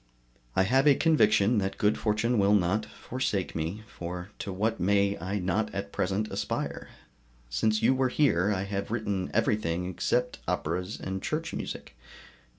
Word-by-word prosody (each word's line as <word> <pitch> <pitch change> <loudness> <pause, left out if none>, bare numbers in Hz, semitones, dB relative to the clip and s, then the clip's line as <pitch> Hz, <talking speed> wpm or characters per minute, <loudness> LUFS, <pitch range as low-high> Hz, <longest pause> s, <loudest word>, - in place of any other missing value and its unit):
I 95 - +4
have 130 +8 +3
a 140 - +7
conviction 115 - +4
that 95 0 -2
good 105 +1 +3
fortune 110 +2 +1
will 100 +1 +5
not 100 +3 +1
forsake 120 -7 -3
me, 85 +7 -3
for 90 -2 -7
to 100 - -4
what 110 +4 -1
may 100 +2 +2
I 95 +4 -2
not 95 +3 0
at 100 - -4
present 100 +3 -1
aspire? - - -3 0.6
Since 110 - +1
you - - +5
were 130 0 +1
here 105 - +2
I 95 -2 0
have 100 0 -3
written 105 -5 -2
everything 90 -4 +1
except 90 -2 -1
operas 90 +6 -2
and 95 0 -4
church 160 +6 -3
music. - - -6
100 Hz, 155 wpm, -28 LUFS, 95-110 Hz, 0.6 s, a